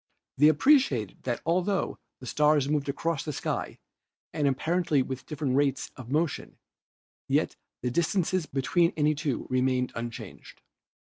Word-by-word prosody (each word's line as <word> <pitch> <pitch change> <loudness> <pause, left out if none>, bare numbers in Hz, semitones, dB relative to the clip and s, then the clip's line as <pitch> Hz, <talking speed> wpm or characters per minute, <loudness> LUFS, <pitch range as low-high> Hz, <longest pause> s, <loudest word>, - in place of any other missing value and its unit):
They 150 - +7
appreciated 155 - +3
that 120 -2 -2
altho 180 +4 0 0.2
the - - -9
stars 150 +1 +3
moved 145 -1 0
across 160 +2 -1
the 155 - -3
sky - - -3 0.6
and 145 -2 +1
apparently 150 +1 +1
with 130 0 -6
different 145 -4 -2
rates 140 -1 +1
of 125 -2 -10
motion, 155 +3 -1 0.7
yet - - +1 0.3
the 125 - 0
distances 170 +2 0
between 165 +6 +1
any 150 0 +3
two 145 -3 -2
remained 130 0 +1
unchanged. 115 -1 -8
145 Hz, 135 wpm, -28 LUFS, 130-165 Hz, 0.7 s, They